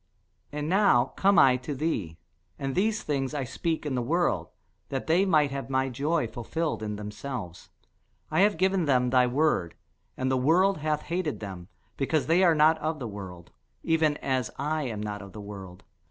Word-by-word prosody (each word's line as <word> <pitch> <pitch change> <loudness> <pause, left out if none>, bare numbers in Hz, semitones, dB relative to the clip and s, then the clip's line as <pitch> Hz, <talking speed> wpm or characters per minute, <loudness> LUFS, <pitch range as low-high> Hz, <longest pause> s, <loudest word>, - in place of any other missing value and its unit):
And 150 0 -3
now 180 -9 +3
come 200 +1 +3
I 130 -1 +6
to 130 +3 -5
thee; 110 - -2 0.4
and 135 -1 -3
these 210 +5 0
things 140 -1 -2
I 140 - -1
speak 160 +6 -3
in 145 - -2
the 125 - 0
world, 170 +8 0 0.4
that 135 -1 -3
they 175 +5 +3
might 155 -6 +3
have 135 -1 -5
my 130 0 +1
joy 145 +4 0
fulfilled 120 +7 -3
in 105 -1 -3
themselves. 105 -3 -7 0.6
I - - +1
have 205 -2 +4
given 190 0 +2
them 125 -3 +2
thy 125 -1 +4
word; 125 - +1 0.4
and 130 0 0
the 130 - +2
world 175 +8 +3
hath 150 0 -1
hated 170 -2 -2
them, 95 -4 -7 0.3
because 145 +2 0
they 170 +4 +3
are 170 -3 +5
not 155 +1 +4
of 155 +1 -2
the 125 -5 -5
world, 95 -4 -9 0.3
even 160 -2 +2
as 130 -3 0
I 150 +1 -1
am 110 -4 -4
not 105 -1 -4
of 100 -1 -11
the 105 - -8
world. 95 -3 -9
140 Hz, 185 wpm, -27 LUFS, 120-160 Hz, 0.6 s, I